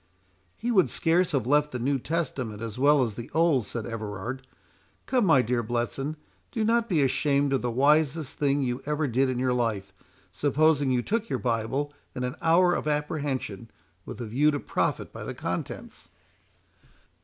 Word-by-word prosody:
"He 240 - -2
would 190 -6 +4
scarce 170 +2 +2
have 130 -6 +1
left 150 +3 +2
the 125 - -3
New 135 +3 0
Testament 130 -8 -3
as 115 +1 -6
well 145 0 +5
as 115 -4 -2
the 120 +5 -8
Old," 160 -9 +3
said 115 0 -4
Everard. 115 +3 -5 0.6
"Come, 250 -5 +2
my 135 -6 +5
dear 120 +1 0
Bletson, 120 +6 -2 0.4
do 225 -3 -1
not 230 +1 +2
be 160 -7 +3
ashamed 140 +1 +2
of 135 - +1
the 125 - -1
wisest 145 +3 +2
thing 140 -1 +1
you 125 0 -2
ever 150 +1 0
did 130 +1 +1
in 130 - -1
your 125 0 +1
life, 105 -6 -1 0.4
supposing 145 0 +2
you 125 -1 +1
took 225 +1 -1
your - - 0
Bible 125 +5 -1 0.2
in 125 - -3
an 125 +2 -3
hour 175 +2 +4
of 155 - -2
apprehension, 145 -7 -2 0.3
with - - -8
a 120 - -4
view 135 +8 +2
to 145 -1 0
profit - - -2
by - - -7
the - - -6
contents." - - -5
135 Hz, 180 wpm, -27 LUFS, 120-155 Hz, 0.6 s, well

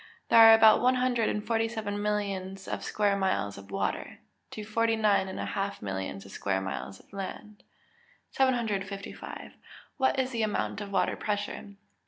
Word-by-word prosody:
_ - - -19 0.3
There - - +7
are 225 0 +10
about 220 -1 +6
one 255 +1 +4
hundred 250 -3 +1
and 210 - -3
forty 225 -1 +1
seven 210 -3 -4
millions 195 -2 -3
of - - -4
square 205 -1 +1
miles 190 - 0
of 100 0 -12
water, - - -3 0.3
to 215 - -7
forty 225 +1 +1
nine 210 -3 +2
and 190 - -6
a - - -2
half 200 0 -3
millions 95 0 -5
of 100 - -12
square 95 -1 -1
miles 95 0 -5
of - - -23
land. 205 +2 -7 0.7
755. 210 -7 -2 0.5
_What 265 0 +2
is 260 0 0
the 230 -2 -2
amount 210 -1 -1
of 200 -1 -7
water - - +1
pressure? 205 -1 -4
205 Hz, 175 wpm, -29 LUFS, 195-225 Hz, 0.7 s, are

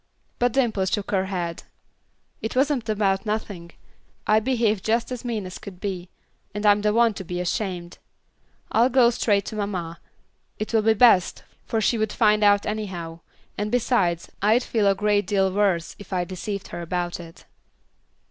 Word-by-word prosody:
But 245 -1 +2
Dimple 230 -8 +1
shook 200 +1 -2
her 190 -2 +1
head. 175 -3 -3 0.8
"It 220 - -4
wasn't 265 -4 +1
about 195 -2 +1
nothing. 205 -6 -4 0.5
I 215 +1 +4
behaved 220 -4 0
just 230 +3 0
as 250 -1 -5
mean 225 -5 -3
as 185 - -8
could 185 -3 -10
be, 185 -3 -4 0.5
and 210 +1 -3
I'm 205 0 +5
the 210 0 +2
one 230 0 +3
to 195 - -7
be 180 0 -4
ashamed. 180 -1 -3 0.7
I'll 235 +3 +4
go 245 -2 +5
straight 205 -4 +1
to - - -6
mamma; 185 -5 -4 0.6
it 215 - -5
will 220 - +4
be 220 +1 +3
best, 210 -5 +4 0.2
for 225 - 0
she 230 +1 +1
would 215 -1 0
find 215 -2 +3
out 205 0 +4
anyhow, 185 -6 -4 0.4
and 210 +1 -2
besides, 200 -9 +1
I'd 220 +5 +3
feel 215 -3 +1
a 195 - +4
great 205 -1 +1
deal 195 -2 +2
worse 190 -5 +1
if 205 - -12
I 180 -2 0
deceived 190 +3 -5
her - - -6
about 175 +1 -3
it." 165 -1 -12
205 Hz, 175 wpm, -24 LUFS, 185-220 Hz, 0.8 s, I'm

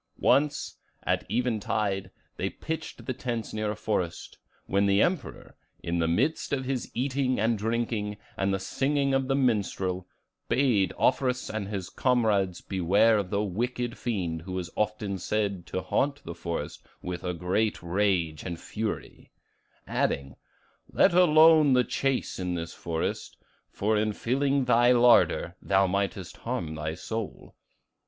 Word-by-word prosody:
Once, 145 +3 +1 0.2
at - - 0
even 120 +1 0
tide, 95 -2 -1 0.3
they 95 - -2
pitched 160 +8 -6
the 130 - -2
tents 120 -3 -4
near 110 -1 -1
a 105 - -2
forest, 95 -5 -3 0.3
when 100 +1 +2
the 100 0 +3
Emperor, 175 - -1 0.3
in 85 0 -1
the 80 - +2
midst 115 - 0
of 135 -2 -1
his 130 -2 -2
eating 130 +1 0
and 115 +2 +2
drinking 110 -1 -2 0.2
and 95 0 0
the 95 - +1
singing 140 +8 0
of 135 -1 +1
the 135 - +1
minstrel, 100 -7 0 0.4
bade 120 -8 +3
Offerus 125 -1 +1
and 110 -3 -3
his 95 -3 -5
comrades 105 -8 +1
beware 100 +4 +3
of 95 -3 -3
the 100 +1 0
wicked 120 +4 -2
fiend 90 -9 -2
who 90 +2 -7
was 90 -2 -3
said - - -25
often 105 -2 -1
to 95 - -3
haunt 140 +1 0
the 85 - -6
forest 85 -3 -5 0.2
with 90 -1 -4 0.2
great 95 +4 0
rage 85 -4 0
and 85 -2 -5
fury, 110 0 -5 0.5
adding, 70 -1 -1 0.6
'Let - - +4
alone 160 -4 +6
the 125 -1 +5
chase 135 -3 -1
in 90 -1 -2
this 85 0 -5
forest; 80 -1 -3 0.3
for 110 +2 0
in 105 0 +1
filling 135 +4 +1
thy 120 0 +5
larder, 120 -7 +4
thou 95 0 +3
mightest 95 -1 -2
harm 115 -10 -3
thy 80 0 -4
soul. 110 +3 -6
105 Hz, 145 wpm, -28 LUFS, 95-125 Hz, 0.6 s, alone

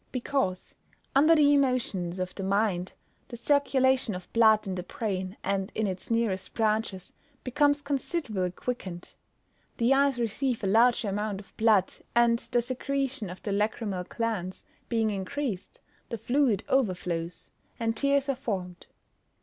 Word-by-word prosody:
_ - - -39
Because, 250 -7 -2 0.4
under 310 +4 +6
the 290 -2 +5
emotions 245 -10 +1
of 185 0 -3
the - - -7
mind, 195 -2 0 0.3
the 240 - -8
circulation 265 -3 +2
of 180 -1 -10
blood 220 -2 +5
in 190 - -3
the 180 - -3
brain, 190 -1 -4
and 195 0 -1
in 220 - 0
its 185 -2 -5
nearest 230 -5 -1
branches, 215 -4 -1 0.3
becomes 285 +2 +2
considerably 275 - -1
quickened. 185 -3 -6 0.6
The 240 +3 +4
eyes 275 -1 +3
receive 235 +1 -1
a - - +1
larger 225 +2 +4
amount 205 0 -2
of 200 - -15
blood, 215 -4 +3 0.2
and 235 0 +4
the 240 - +2
secretion 265 -2 -2
of 180 - -9
the 205 - -2
lachrymal 205 -2 -1
glands 210 -5 -3 0.2
being 225 -2 +1
increased, 200 +2 -4 0.3
the 230 - -3
fluid 240 -2 +1
overflows, 180 -8 -1 0.3
and 225 -1 0
tears 280 +3 +2
are 275 - +2
formed. 190 -9 -5
225 Hz, 145 wpm, -28 LUFS, 190-260 Hz, 0.6 s, under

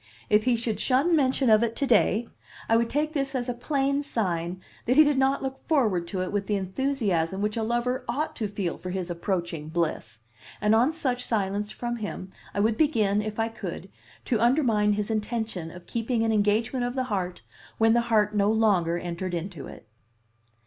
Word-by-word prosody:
If 210 0 +4
he 250 -1 +3
should 225 -2 -2
shun 280 +7 +3
mention 265 -2 +2
of 215 0 +6
it 230 -1 0
to 280 - 0
day, 230 -1 +3 0.4
I 225 - +3
would 230 0 +2
take 300 +3 -1
this 275 -2 -1
as 245 -1 -1
a 245 - -1
plain 275 +3 0
sign 180 -10 -2 0.3
that 250 - +2
he 310 - +9
did 290 -2 +2
not 270 +1 +2
look 265 0 -4
forward 215 - +2
to 185 +1 -2
it 185 - -4
with 205 -1 -2
the 210 - +1
enthusiasm 195 -4 -1
which 210 +1 -1
a 230 - -1
lover 240 +3 -1
ought 295 +6 -2
to 220 - -1
feel 195 -4 -3
for 185 - -6
his 180 -1 -3
approaching 170 -3 -3
bliss; 155 -10 -2 0.4
and 210 +1 +3
on 240 +7 +4
such 255 -6 -1
silence 205 -2 -1
from 240 +2 -4
him 200 -3 -6 0.2
I - - -3
would 220 +2 +2
begin, 215 -9 +2
if 215 0 -5
I 225 0 0
could, 225 - -7 0.3
to 230 -4 0
undermine 230 -5 +3
his 210 +1 -2
intention 215 -5 -2
of 175 +1 -12
keeping 230 +2 -1
an 225 - +1
engagement 220 +4 +1
of 245 +1 -2
the 260 - 0
heart 180 -2 -3 0.3
when 225 0 +4
the 240 - +4
heart 210 -2 +3
no 205 -1 +2
longer 195 -7 +2
entered 175 +1 -4
into 170 -4 -5
it. 115 - -12
220 Hz, 200 wpm, -26 LUFS, 190-250 Hz, 0.4 s, he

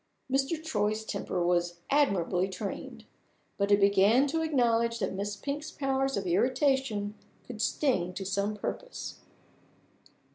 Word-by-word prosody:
Mr. 270 +4 +1
Troy's 215 -7 -1
temper 180 -4 -2
was 175 0 +1 0.2
admirably 195 - +2
trained. 190 - -6 0.5
But 200 +1 +1
it 205 - +6
began 200 +6 +5
to 325 +3 0
acknowledge 235 -6 +2
that - - -2
Miss 200 +2 -3
Pink's 290 +8 -4
powers 270 -1 0
of - - -2
irritation 265 - +1 0.3
could 225 -3 -6
sting 225 - +1
to 195 - -4
some 200 +2 -1
purpose. - - -5
225 Hz, 130 wpm, -29 LUFS, 200-270 Hz, 0.5 s, it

